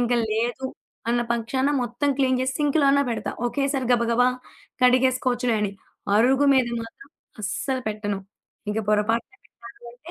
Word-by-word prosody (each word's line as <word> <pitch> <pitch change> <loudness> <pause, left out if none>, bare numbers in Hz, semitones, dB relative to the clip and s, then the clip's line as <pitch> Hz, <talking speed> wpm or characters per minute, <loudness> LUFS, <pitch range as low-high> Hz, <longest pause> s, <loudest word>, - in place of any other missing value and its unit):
ఇంక 245 0 +1 0.2
లేదు 240 +4 -1 0.4
అన్న 240 - +2
పక్షాన 245 +4 0
మొత్తం 245 +4 -2
క్లీన్ 260 -1 +2
చేసి, 260 0 -1
సింక్‌లోనే 280 -1 +3
పెడతా. 230 - -3 0.2
ఒకేసారి 275 -1 -1
గబగబా 235 +1 +3 0.6
కడిగేసుకోవచ్చులే 250 -1 +2
అని. 200 -1 -1 0.4
అరుగు 265 +5 +4
మీద 255 -2 +3 0.2
మాత్రం 230 - -13 0.3
అస్సలు 260 +5 -2
పెట్టను. 205 -2 -3 0.5
ఇంక 210 +1 -1
పొరపాటున 215 +2 +1
ఏమన్నా 235 - -15 0.2
పెడితే, 245 +8 -12
245 Hz, 130 wpm, -24 LUFS, 230-265 Hz, 0.6 s, అరుగు